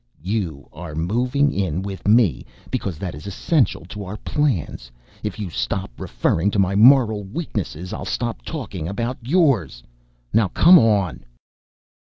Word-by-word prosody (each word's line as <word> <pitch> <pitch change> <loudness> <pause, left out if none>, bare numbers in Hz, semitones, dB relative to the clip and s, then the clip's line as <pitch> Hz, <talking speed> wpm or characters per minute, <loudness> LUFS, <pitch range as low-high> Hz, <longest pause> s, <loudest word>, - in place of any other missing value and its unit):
"You 90 -8 -3
are 80 -2 -8
moving 125 - +1
in 95 -2 -1
with 95 -2 -6
me 110 -4 +4 0.3
because 95 -5 -3
that 90 0 -5
is 75 +7 -9
essential 120 - 0
to 100 +3 -7
our 100 +3 -6
plans. 105 - -2
And - - -30 0.3
if 105 - -6
you 100 -5 -5
stop - - -3
referring 80 +9 0
to 105 - -2
my 95 -1 +2
moral 110 -2 +5
weaknesses 95 - -5
I'll - - -5
stop 120 -2 -3
talking 100 - -5
about 115 +7 -3
yours. 125 - +1 0.5
Now 115 -3 +4
come 175 - +7
on." 100 - +1
100 Hz, 150 wpm, -21 LUFS, 90-120 Hz, 0.5 s, come